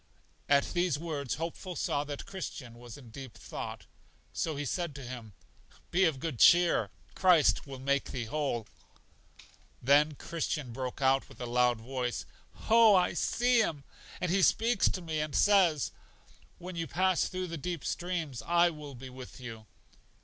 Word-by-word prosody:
At 140 -1 +3
these 175 -4 +1
words 145 -5 -3
Hopeful 170 +3 -5
saw 145 -2 0
that 145 -1 -6
Christian 145 -10 -7
was 120 -2 -10
in 125 -5 -14
deep 130 0 -9
thought; - - -7 0.5
so 160 -2 -2
he 145 +1 -3
said 170 0 -2
to 140 - -8
him: 120 -4 -8 0.6
Be 185 +2 +4
of 155 -6 0
good 145 -5 -4
cheer, 175 0 +5 0.2
Christ 175 -6 +4
will 135 -1 -7
make 140 +1 0
thee 120 -3 -4
whole. 130 -3 -2 1.1
Then 145 +4 +4
Christian 150 -5 -3
broke 130 +2 -4
out 135 0 +3
with - - -15
a 125 - -4
loud 120 -1 +2
voice: 125 +1 -3 0.4
Oh, 225 -2 +7
I 180 -1 +3
see 245 +7 +2
Him, 155 -10 0 0.4
and 180 -2 -1
He 195 +1 +3
speaks 225 +3 +3
to 185 - -4
me 160 -2 -2
and 150 -2 -3
says, 185 -8 +4 0.7
When 180 0 -8
you 165 -1 -3
pass 185 -1 +2
through 185 0 -3
the 165 - -4
deep 175 0 -4
streams, 170 -8 -3
I 170 0 +3
will 150 -3 -9
be 130 +1 -9
with 130 0 -10
you. 115 -3 -9
150 Hz, 165 wpm, -31 LUFS, 130-175 Hz, 1.1 s, Oh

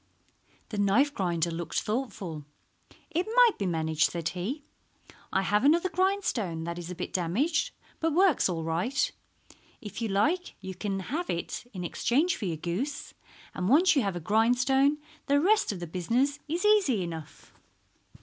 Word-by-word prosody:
The 210 - -4
knife 230 +9 +3
grinder 170 - 0
looked 165 0 -2
thoughtful. 210 - -4 0.7
"It 345 +3 0
might - - +6
be 200 - 0
managed," 160 -2 +1
said 170 -1 -2
he. 225 - -4 0.7
"I 190 - +1
have 210 +3 +2
another 335 +6 +4
grindstone 365 - 0
that 170 +1 -4
is 175 0 -7
a 180 - -5
bit 180 - -5
damaged, 235 - +1 0.3
but 325 0 +1
works 345 - +4
all 165 -2 -2
right. 175 - 0 0.7
If 210 +1 -8
you 225 - 0
like 305 - 0
you 190 -1 -6
can 195 +1 -3
have 310 - -3
it 175 +7 -4
in 185 -3 -6
exchange 280 - +1
for 215 - -5
your 165 -4 -2
goose, 195 - -4 0.4
and 180 +1 -2
once 340 +7 +5
you 275 - +4
have 195 -4 -1
a - - -3
grindstone 250 - +3 0.3
the 285 +1 +4
rest 415 - +3
of 195 - -5
the 175 - -4
business 235 - 0
is 340 +6 -2
easy 385 - +4
enough." 165 -3 -8
215 Hz, 165 wpm, -28 LUFS, 175-290 Hz, 0.7 s, might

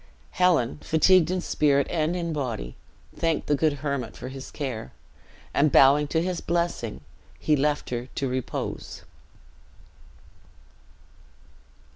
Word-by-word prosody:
Helen, 165 - +2
fatigued 170 +1 +4
in 185 0 -1
spirit 140 -4 +2
and 165 0 0
in 170 -2 -2
body, 120 - -4 0.4
thanked 165 -2 0
the - - +1
good 150 +1 +2
hermit 140 -5 -3
for 130 - -7
his 135 0 -8
care; 125 - -5 0.6
and 145 0 +3
bowing 145 +2 +6
to 160 +3 0
his 180 -1 -2
blessing, 170 - -2 0.4
he 155 - +2
left 145 0 0
her 120 0 -3
to 135 - -1
repose. 130 -1 -4
150 Hz, 120 wpm, -26 LUFS, 130-165 Hz, 0.6 s, bowing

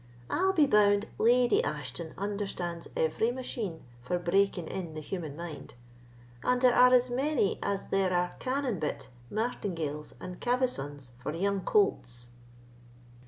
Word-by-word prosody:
I'll 380 +2 +3
be 320 -6 +4
bound, 205 -4 +4
Lady 250 - +4
Ashton 165 - -4
understands 195 -4 -3
every 160 +8 +1
machine 235 -8 -4 0.2
for 125 +9 -1
breaking 180 0 +1
in 170 -4 -5
the - - -4
human 155 -1 -5
mind, 170 -6 -8 0.7
and 250 0 +2
there 250 -1 +5
are 250 +1 +7
as 250 0 +4
many 265 -5 +1
as 200 -1 -2
there 195 -1 +2
are 180 0 +1
cannon 255 -6 -1
bit, 150 -1 -3 0.2
martingales, 165 -9 -3
and 180 -1 -7
cavessons 145 - -1
for 150 +5 -4
young 200 +2 0
colts." 125 - +1
195 Hz, 135 wpm, -30 LUFS, 165-245 Hz, 0.7 s, are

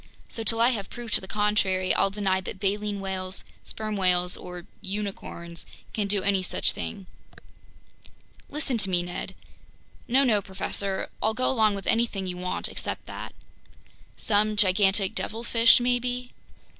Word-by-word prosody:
So 225 - -4
till 225 +1 +4
I 235 +2 +6
have 205 -6 -3
proof 240 -2 -8
to - - +5
the 190 - -9
contrary, 200 -3 +1
I'll 195 - +3
deny 195 -2 0
that 190 - -7
baleen 205 +1 -1
whales, 190 -1 0 0.2
sperm 215 -1 -4
whales, 180 -2 +4
or 180 -1 -8 0.2
unicorns 190 -4 -4 0.3
can 210 -2 0
do 200 -1 +2
any 195 -1 +2
such 185 - +1
thing." 195 -3 -6 1.4
"Listen 285 -5 -1
to 195 - +1
me, 175 -1 +2
Ned—" 175 0 -6 0.7
"No, 265 +3 +4
no, 220 -6 +3
professor. 190 0 -3
I'll 220 +1 +1
go 255 - +1
along 220 -5 +3
with 195 - -6
anything 225 -4 +1
you 180 -1 -3
want 180 0 -2
except - - -5
that. - - -8 0.8
Some 215 0 +2
gigantic 195 0 +4
devilfish 230 +1 +3
maybe.. 245 0 0
200 Hz, 150 wpm, -26 LUFS, 190-225 Hz, 1.4 s, I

